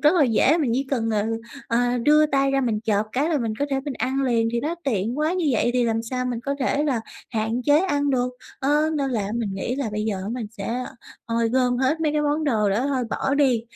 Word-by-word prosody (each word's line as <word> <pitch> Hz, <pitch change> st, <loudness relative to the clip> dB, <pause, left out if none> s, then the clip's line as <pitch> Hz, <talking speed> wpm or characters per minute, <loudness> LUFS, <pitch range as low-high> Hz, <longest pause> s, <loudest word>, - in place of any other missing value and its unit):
rất 300 Hz, +4 st, +5 dB
là 315 Hz, -6 st, +5 dB
dễ, 260 Hz, +7 st, +3 dB
mình 285 Hz, -7 st, +1 dB
chỉ 270 Hz, +1 st, -1 dB
cần, 225 Hz, -4 st, 0 dB
ừ, 220 Hz, +2 st, -1 dB, 0.3 s
ờ, 245 Hz, +1 st, +1 dB
đưa 300 Hz, +5 st, +5 dB
tay 275 Hz, -2 st, +1 dB
ra 275 Hz, 0 st, +2 dB
mình 225 Hz, -4 st, 0 dB
chộp 210 Hz, -1 st, +1 dB
cái 285 Hz, +5 st, +1 dB
là 315 Hz, -, +1 dB
mình 230 Hz, -4 st, -2 dB
có 285 Hz, -, +1 dB
thể 270 Hz, -1 st, 0 dB
mình 280 Hz, -1 st, -5 dB
ăn 265 Hz, +2 st, -1 dB
liền, 230 Hz, -3 st, +2 dB
thì 235 Hz, -, 0 dB
nó 315 Hz, +4 st, -2 dB
tiện 230 Hz, +1 st, -1 dB
quá, 310 Hz, +2 st, +1 dB
như 360 Hz, -4 st, 0 dB
vậy 240 Hz, +1 st, +2 dB
thì 250 Hz, -1 st, +2 dB
làm 225 Hz, 0 st, 0 dB
sao 250 Hz, +2 st, -3 dB
mình 245 Hz, -2 st, -2 dB
có 280 Hz, +2 st, -2 dB
thể 285 Hz, +2 st, +1 dB
là 260 Hz, -6 st, 0 dB, 0.3 s
hạn 225 Hz, +2 st, -1 dB
chế 290 Hz, +2 st, +5 dB
ăn 290 Hz, -6 st, +1 dB
được. 250 Hz, -1 st, +1 dB, 0.3 s
Ơ, 295 Hz, +3 st, +2 dB
nên 275 Hz, -2 st, -1 dB
là 205 Hz, -5 st, -1 dB
mình 230 Hz, -4 st, -2 dB
nghĩ 235 Hz, +6 st, -2 dB
là 270 Hz, -6 st, -2 dB
bây 210 Hz, 0 st, -2 dB
giờ 210 Hz, -3 st, -1 dB
á 200 Hz, -, -5 dB
mình 240 Hz, -3 st, -4 dB
sẽ 230 Hz, +4 st, -4 dB, 0.4 s
ôi, 230 Hz, 0 st, +1 dB
gom 250 Hz, 0 st, +2 dB
hết 265 Hz, +5 st, +1 dB
mấy 305 Hz, -2 st, +1 dB
cái 300 Hz, -, +1 dB
món 295 Hz, +1 st, 0 dB
đồ 215 Hz, -8 st, +2 dB
đó 230 Hz, +8 st, +1 dB
thôi 260 Hz, -3 st, 0 dB
bỏ 275 Hz, -, 0 dB
đi, 260 Hz, -6 st, +3 dB
250 Hz, 260 wpm, -23 LUFS, 230-285 Hz, 0.4 s, rất